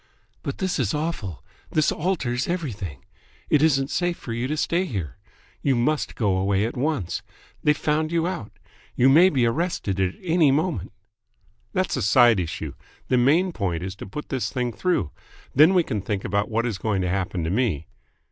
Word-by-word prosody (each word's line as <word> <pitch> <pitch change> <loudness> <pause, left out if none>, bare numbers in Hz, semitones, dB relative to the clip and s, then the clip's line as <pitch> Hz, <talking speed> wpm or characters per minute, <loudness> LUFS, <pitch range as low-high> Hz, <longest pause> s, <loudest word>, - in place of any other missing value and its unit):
"But 140 - -4
this 190 -4 -1
is 120 -3 0
awful. 150 - -3 0.3
This 155 -1 +2
alters 145 -8 -1
everything. 105 - -4 0.5
It 150 - +5
isn't 135 -2 +3
safe 175 -1 0
for 115 - -6
you 120 +2 -2
to 155 +3 -2
stay 170 +4 +1
here. 90 - -4 0.4
You 135 -2 +2
must 150 +6 0
go 100 -5 +1
away 100 +2 +1
at 115 - -4
once. 135 - -1 0.4
They've 150 0 +3
found 155 +1 0
you 170 -1 +1
out. 145 - -4 0.4
You 130 +2 +5
may 170 +7 +7
be 130 -8 +2
arrested 115 - -1
at 95 -1 0
any 165 -4 +4
moment." 145 - 0 0.8
"That's - - 0
a - - -1
side 115 +1 +5
issue. 80 -4 -4 0.4
The 125 - +3
main 160 +9 +3
point 90 - -2
is 95 0 -4
to - - -8
put 150 +10 -7
this 130 -3 -2
thing 125 -2 -2
through. 180 - 0 0.4
Then 155 +7 +6
we 180 - +5
can 105 -9 -3
think 100 0 -3
about 100 +1 0
what 115 +1 0
is 110 -6 -2
going 105 -4 0
to - - 0
happen 90 -2 -1
to 80 - -1
me." 100 - 0
125 Hz, 185 wpm, -24 LUFS, 100-155 Hz, 0.8 s, may